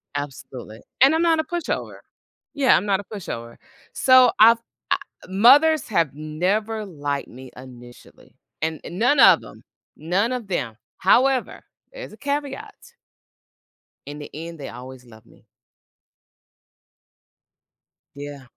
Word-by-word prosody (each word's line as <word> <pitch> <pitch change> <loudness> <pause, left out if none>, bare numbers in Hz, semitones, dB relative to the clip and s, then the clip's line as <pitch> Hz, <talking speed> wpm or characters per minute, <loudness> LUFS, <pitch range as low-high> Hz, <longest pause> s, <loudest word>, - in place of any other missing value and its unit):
Absolutely, 125 -5 -7 0.2
and 270 +3 +7
I'm 320 - +1
not 330 -2 +2
a - - +1
pushover. 340 +1 -4 0.6
Yeah, 275 -2 +4
I'm 195 - -2
not 195 -1 +1
a - - -11
pushover. 115 - -8 0.4
So, 255 -2 +5
I 220 +2 +8
f 230 - -5 0.3
I - - +4 0.3
mothers 285 +12 +5
have 165 -9 0
never 190 +9 -2
liked 145 -6 -4
me 130 +1 -12
initially, 125 -1 -15 0.3
and 160 -1 -2
and 175 - -8
none 250 +6 +2
of - - +7
'em, - - -14 0.3
none 185 +9 -1
of 245 -5 -5
them. 130 - -3 0.2
However, 255 +6 +2 0.3
there's - - -9
a - - -13
caveat 280 +1 -4 1.3
in 145 +1 -8
the 145 - -9
end, 165 +1 -8
they 140 - -7
always 125 +1 -11
love 110 -2 -17
me. - - -23 2.7
Yeah. 145 -1 -9
185 Hz, 135 wpm, -22 LUFS, -, 2.7 s, I